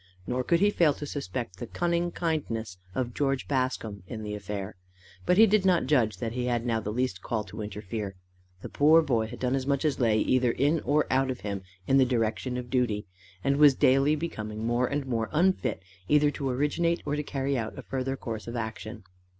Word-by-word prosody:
Nor 125 +3 -1
could 170 +6 +2
he 205 0 +5
fail 160 -7 +3
to 145 - -6
suspect 120 -8 -5
the - - -5
cunning 175 0 0
kindness 115 - -3 0.2
of 120 0 -2
George 135 -2 -1
Bascombe 130 -6 -1
in 110 -1 -6
the 105 0 -4
affair. 100 0 -5 0.5
But 180 - +4
he 220 - +9
did 215 -1 +3
not 185 -3 +3
judge 120 -8 +2
that 115 -2 -3
he 125 +1 -2
had 120 -1 0
now 115 -2 +1
the 105 -1 -4
least 115 -5 -1
call 110 +1 -2
to 105 +2 -8
interfere. 105 -1 -5 0.5
The - - -6
poor 160 +3 +5
boy 115 -6 +1
had 120 +2 -9
done 125 0 0
as 135 -1 -1
much 140 +2 +1
as 150 -3 +1
lay 115 -4 +3
either 125 +2 +2
in 145 +4 +2
or 150 +1 +1
out 135 0 +2
of 125 - -4
him 100 -2 -4 0.2
in 135 - +3
the 130 - +6
direction 120 +1 -1
of 120 -1 -6
duty, 120 -5 0 0.4
and 140 0 +2
was 145 -2 +7
daily 135 +4 +4
becoming 110 -9 -4
more 120 +2 +1
and 145 +1 -2
more 115 -4 -1
unfit 180 - +1 0.2
either 150 0 +4
to 140 -2 -3
originate 150 +6 0
or 145 - -1
carry 140 -2 -2
out 115 -4 -3
a - - -7
further 135 0 -3
course 110 -4 -6
of 120 - -5
action. 110 -1 -5
130 Hz, 210 wpm, -28 LUFS, 110-145 Hz, 0.5 s, he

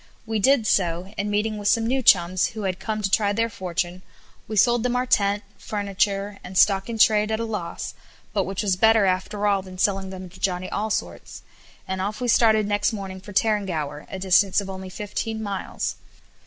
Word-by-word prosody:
We 220 -1 -1
did 260 +1 +4
so, 180 -1 0
and 205 +1 -2
meeting 210 +1 -1
with 205 - -3
some 225 +2 +3
new 260 +3 +1
chums 185 -4 +4
who 215 - -3
had 185 -1 -2
come 215 -1 -3
to 195 - 0
try 205 -1 +2
their 230 +2 0
fortune, 180 -1 -3 0.5
we 215 - -4
sold 240 +3 +4
them 250 +1 0
our 250 +1 +1
tent, 205 -3 +2 0.2
furniture, 200 0 -2
and 185 +1 -6
stock 195 +2 +4
in 230 - -3
trade 215 -1 +4
at 220 - 0
a 230 - -1
loss; 210 -6 -5 0.4
but 195 -3 +1
which 195 +2 -3
was 195 -3 +2
better 220 +2 +4
after 190 +2 -1
all 200 -2 +2
than 185 -1 -11
selling 190 0 0
them 185 -1 -8
to 180 - -16
Johnny 185 -1 -1
Allsorts, 215 0 -3 0.4
and 190 0 -3
off 205 +2 -3
we 250 - -2
started 220 -2 +4
next 205 0 +1
morning 190 -2 -6
for 205 - -11
Tarrangower, 185 -9 -1
a - - -5
distance 190 +1 +3
of 195 -1 -4
only 190 0 -7
fifteen 220 +3 -4
miles. 200 -2 -3
200 Hz, 200 wpm, -24 LUFS, 190-215 Hz, 0.5 s, did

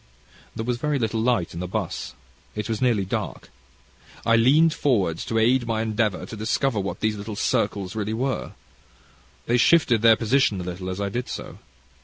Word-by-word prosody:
"There 110 - -4
was 120 0 -1
very 150 +2 0
little 110 -2 -1
light 115 -7 +1
in 85 - -6
the 90 - -3
'bus. - - -4 0.4
It 105 -1 -3
was 110 -2 -3
nearly 115 -6 +2
dark. 95 - -4 0.7
I 115 - +4
leaned 150 +8 +5
forward 100 - +1
to 115 - -2
aid 120 +2 +3
my 110 -1 0
endeavour 110 -3 -1
to - - -8
discover 110 +2 0
what 100 0 -4
these 110 -1 0
little 105 +1 -6
circles 105 -3 -1
really 110 0 -2
were. 130 +3 -2 0.9
They 120 - +2
shifted 120 -4 +4 0.2
position 115 -3 +2
a - - -4
little 90 +1 -5
as 95 +1 -4
I 100 -1 -1
did 120 +5 -4
so. - - -7
110 Hz, 180 wpm, -24 LUFS, 100-125 Hz, 0.9 s, leaned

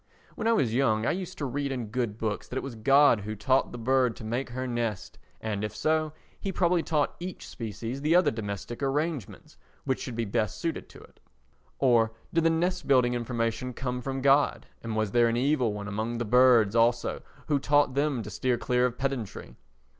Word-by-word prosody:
When 220 - -3
I 230 - +4
was 125 - +1
young 115 -4 +2
I - - +2
used 185 +1 -5
to 145 - -3
read 140 +2 -2
in 120 -5 -4
good 120 -3 -2
books 110 -2 -3
that - - -8
it - - -2
was 135 - -6
God 135 +2 +5
who 105 +2 -5
taught 130 +6 +1
the - - -7
bird 125 0 +2
to - - -11
make 120 +4 -3
her 130 +2 -4
nest, 115 -7 -3 0.2
and, 105 -2 -3
if 105 - -4
so, 155 0 +1 0.3
He 195 - -3
probably 175 -2 +2
taught 150 -3 0
each 180 +1 -7
species 115 +3 -6
the 155 +3 +3
other 180 - +5
domestic 105 +1 -5
arrangements 145 - -3 0.3
which 130 -2 -1
should 125 - -5
be 115 0 -1
best 100 0 -1
suited 165 -1 -4
to - - -14
it. - - -19 0.6
Or 115 -4 +3 0.2
did 165 -1 +2
the - - +6
nest 175 +3 0
building 125 -3 +4
information 120 +1 -2
come 125 -1 -3
from 135 +1 -3
God 140 +1 +3 0.2
and 115 -1 -4
was 110 -2 0
there 120 +1 +4
an 115 0 0
Evil 130 -3 +2
One 105 0 -5
among 110 +3 -3
the 120 - -2
birds 120 -2 +5
also 120 +1 +2 0.2
who 145 -2 +1
taught 145 -1 +3
them 140 -3 0
to 105 - -8
steer 125 -2 0
clear 125 +1 +2
of 125 0 -7
pedantry? 130 -6 -4
125 Hz, 205 wpm, -28 LUFS, 115-140 Hz, 0.6 s, the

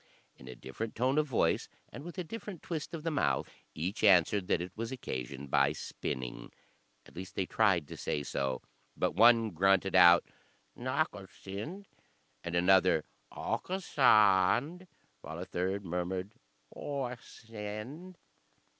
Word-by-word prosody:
In 65 - -15
a 65 - -8
different 85 - -6
tone 130 +5 +2
of 155 - +1
voice, 130 - +1 0.2
and 140 - -8
with 175 +3 -9
a 180 - -2
different 205 -1 -8
twist 165 0 -4
of 155 - -7
the 165 - -1
mouth, 145 - 0 0.3
each 90 +8 -3
answered 95 -1 +5
that - - +2
it 90 +1 -5
was 115 +2 -4
occasioned 70 - -6
by 70 +1 +3
spinning. 65 -4 -5 0.5
At - - -18
least 95 +2 -8
they 95 - 0
tried 95 -7 +2
to - - -8
say 75 - -2
so, 65 -2 -2 0.3
but - - +1
one 115 -1 +5
grunted 95 +2 +2
out 85 -1 +8 0.5
"Nakasind," 125 - -4 0.6
and 85 0 -4
another 90 -2 +4 0.3
"Owkasaänd," 135 - +2 0.3
while 80 +2 -7
a 90 - -5
third 95 +3 -2
murmured 90 +3 -3 0.4
"O 140 -2 -3
a - - -4
a 125 - -7
send." 115 - -8
100 Hz, 145 wpm, -31 LUFS, 90-135 Hz, 0.6 s, out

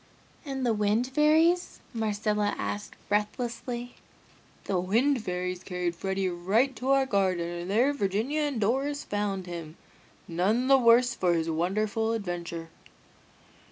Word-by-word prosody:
"And 270 -4 -3
the 235 - +3
Wind 210 +3 +1
Fairies?" 315 +6 +3
Marcella 210 -2 0
asked 205 0 -4
breathlessly. 235 +3 -2 0.7
"The 190 -2 0
Wind 230 +7 +2
Fairies 180 -1 -3
carried 180 -2 -2
Freddy 190 +2 -1
right 200 +10 +1
to 260 - -3
our 275 0 +4
garden 190 -7 +1
and 175 +1 -5
there 245 +8 +3
Virginia 225 +6 -1
and 290 -5 -1
Doris 270 +7 0
found 205 -2 -2
him, 170 -2 -7 0.5
none 200 +9 +1
the 270 0 +6
worse 240 +1 +5
for 180 -2 +1
his 165 0 0
wonderful 215 +7 0
adventure!" 175 -5 -4
210 Hz, 130 wpm, -28 LUFS, 180-250 Hz, 0.7 s, the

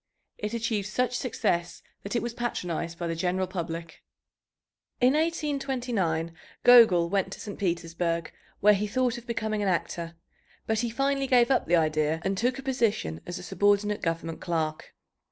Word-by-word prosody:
It 210 +2 -3
achieved 220 -3 -1
such 250 +4 0
success 175 -8 -1 0.2
that 200 - -5
it 235 - +1
was 235 -1 -3
patronized 170 -8 -3
by 175 - -4
the 165 - -1
general 185 +2 0
public. 170 -3 -6 1.0
In 255 +2 +5
1829 260 - -1 0.3
Gogol 220 -9 +7
went 190 +1 0
to - - -9
St. 205 - -7
Petersburg, 170 -2 -1 0.3
where 210 +1 +7
he 205 +1 0
thought 245 +2 0
of 240 - -19
becoming 220 -2 -2
an 200 - 0
actor, 170 -1 -2 0.5
but 220 -1 0
he 235 +1 0
finally 275 +3 0
gave 245 -1 +4
up 265 - +2
the 175 - +4
idea 155 -1 +1
and 195 0 +1
took 245 +5 0
a 270 - -7
position 225 - 0
as 175 - -4
a 180 - -8
subordinate 205 +2 +1
government 165 -1 -3
clerk. 160 -3 -3
200 Hz, 165 wpm, -27 LUFS, 170-240 Hz, 1.0 s, Gogol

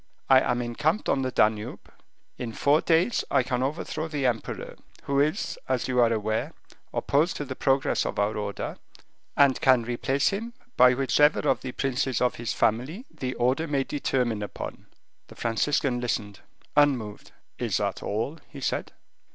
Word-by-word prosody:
I 130 - +9
am 125 -1 0
encamped 150 - -1
on 135 - +2
the 130 - -1
Danube. 110 -3 0 0.5
In 120 -2 -4
four 145 +6 +3
days 170 +8 +2
I 135 -2 +3
can 125 0 -1
overthrow 155 +3 -2
the 145 -4 -2
emperor, 120 -3 -2 0.3
who 140 0 0
is, 155 +8 0
as 130 -2 0
you 125 -1 +1
are 120 -1 +5
aware, 110 0 -1 0.4
opposed 155 +6 +1
to 145 - -4
the 130 -1 -6
progress 135 0 +1
of - - -4
our 105 +1 +1
order, 105 -1 -4 0.6
and 140 -2 +4
can 130 -3 +5
replace 125 +4 0
him 230 +4 -4 0.2
by 125 0 +6
whichever 145 +3 +3
of - - +1
the 130 -1 -6
princes 135 -2 -1
of 125 - +2
his 120 -1 -3
family 135 - 0
the 130 -5 -4
order 130 +7 +1
may 140 -3 +1
determine 125 -6 -1
upon." 105 - -7 0.4
The - - -14
Franciscan 125 +2 0
listened, 105 -4 -3 0.4
unmoved. 130 -8 +1 0.3
"Is - - 0
that - - -2
all?" 115 +10 -3
he 140 - -10
said. 130 - -2
130 Hz, 165 wpm, -26 LUFS, 120-145 Hz, 0.6 s, I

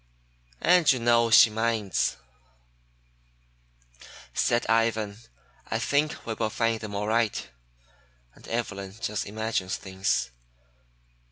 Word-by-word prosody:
"And 175 -2 +5
you 130 - +1
know 115 -1 +3
she 110 0 +7
minds," 110 - 0 2.2
said 120 - +1
Ivan. 110 -2 +1 0.5
"I 110 - 0
think 145 +6 0
we 115 - -3
will 110 0 -2
find 115 0 0
them 105 -2 -6
all 100 +1 -2
right, 115 -1 0 0.9
and - - -17
Evelyn 100 -4 -4
just 105 -2 -3
imagines 105 -3 -2
things. 95 -7 -2
110 Hz, 105 wpm, -26 LUFS, 105-115 Hz, 2.2 s, she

